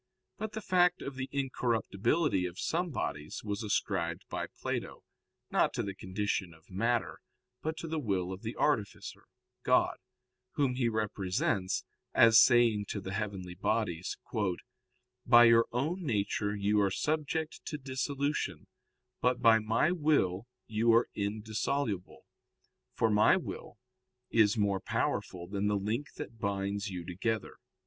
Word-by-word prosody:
But 215 -1 -4
the 220 - -4
fact 180 -2 +3
of 140 - -5
the 130 0 -5
incorruptibility 125 - 0
of 90 0 -10
some 175 +2 -1
bodies 75 - -4
was 105 0 -3
ascribed 105 -2 -1
by - - -3
Plato, - - -5 0.5
not - - +2
to - - -1
the 100 - -4
condition 95 -2 -3
of 80 +3 -23
matter, 115 +5 0 0.4
but 160 +1 -3
to 165 - -5
the 160 0 -2
will 95 -7 -1
of 95 - -9
the 115 +1 -5
artificer, 115 -9 -1 0.4
God, - - +3 0.6
Whom 140 -3 +1
he 125 -2 +1
represents 100 -3 -1 0.3
as 115 -1 +8
saying 115 -4 +4
to 105 - -2
the 95 -1 -6
heavenly 95 -3 -4
bodies: 90 -2 -1 1.1
"By 120 -1 +8
your 115 0 +6
own 155 +10 -1
nature 105 -4 0
you 105 +1 +2
are 100 - +3
subject 155 - -2
to 150 - -4
dissolution, 140 +1 -2 0.6
but 125 0 +2
by 115 -1 +6
My 110 +9 +2
will 145 - +1 0.2
you 115 +1 +2
are 115 +1 +4
indissoluble, 110 +1 -2 0.7
for 115 - +2
My 105 +1 +5
will - - -7 0.5
is 110 0 +4
more 100 -2 +1
powerful 90 -1 -2
than 100 +2 -2
the 105 0 +2
link 110 +9 -2
that 115 - -8
binds 100 0 -2
you 90 -3 -6
together." 100 +5 -3
110 Hz, 140 wpm, -31 LUFS, 100-130 Hz, 1.1 s, as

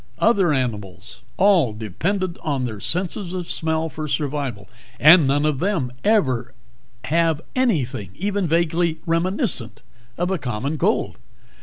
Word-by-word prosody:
Other 200 -7 +3
animals 105 -8 -3 0.2
all 185 - +4
dependent 170 - -2
on 140 -4 -1
their 110 -4 -5
senses 180 - -2
of 180 -2 -4
smell 160 0 -1
for 155 -1 -6
survival 140 - -3 0.3
and 155 0 +8
none 145 +2 +2
of 150 -3 0
them 170 -10 0
ever 130 - +1 0.5
have 160 +2 +1 0.2
anything 140 - 0
even 200 -1 -1
vaguely 165 0 +1
reminiscent 165 - -1 0.3
of 175 +2 -1
a 190 - 0
common 135 +4 -3
cold. - - 0
155 Hz, 130 wpm, -22 LUFS, 130-180 Hz, 0.5 s, and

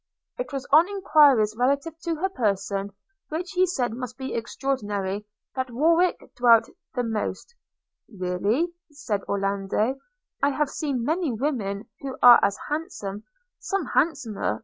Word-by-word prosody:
It - - -4
was 275 -1 -4
on 320 +6 +6
enquiries 290 - +4
relative 280 +7 0
to 335 -1 0
her 370 +5 -1
person, 200 - -1 0.4
which 335 +4 -4
he 370 -1 +3
said 250 -10 -1
must 250 0 -6
be 265 0 -5
extaordinary, 210 -5 -3 0.3
that 260 -1 -2
Warwick 330 +8 +2
dwelt 235 -2 +5 0.3
the 245 - 0
most 225 - -3 0.3
– - - -48
'Really,' 205 - -1 0.2
said 255 -9 -3
Orlando, 200 +5 0 0.4
'I 280 - +4
have 285 0 -1
seen 270 -6 -2
many 320 0 0
women 220 -5 -2
who 270 -1 -6
are 245 -1 +10
as 200 - +1
handsome, 290 - -4 0.3
some 390 -5 -2
handsomer. 245 - 0
255 Hz, 140 wpm, -25 LUFS, 210-305 Hz, 0.4 s, are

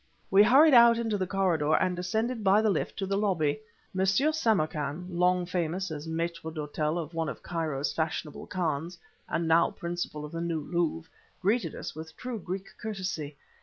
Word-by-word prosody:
We 195 +1 +7
hurried 270 +8 +7
out 235 -1 +8
into 225 -2 -1
the 185 - -1
corridor, 175 -6 +2
and 185 -1 +1
descended 220 +6 -2
by 200 +2 +5
the 215 - +3
lift - - -2
to 195 - -1
the 195 +1 0
lobby. 175 -6 +1 0.4
M. 190 - +1
Samarkan, 190 - +1
long 180 +1 +2
famous 180 +1 -2
as 150 0 -6
mâitre 165 0 -3
d'hôtel 155 +1 -2
of 170 0 -5
one 165 -1 -1
of - - -8
Cairo's 155 -5 -2
fashionable 160 -2 -3
khans, 170 -1 -2 0.3
and 165 - -1
now 165 +1 +4
principal 170 -3 -4
of 150 - -9
the 165 - -4
New 170 -2 -1
Louvre, 165 0 -1 0.3
greeted 195 -3 0
us - - -6
with 160 +1 -9
true 250 -3 -5
Greek 190 +1 -5
courtesy. 185 -9 -4
175 Hz, 175 wpm, -29 LUFS, 160-195 Hz, 0.4 s, out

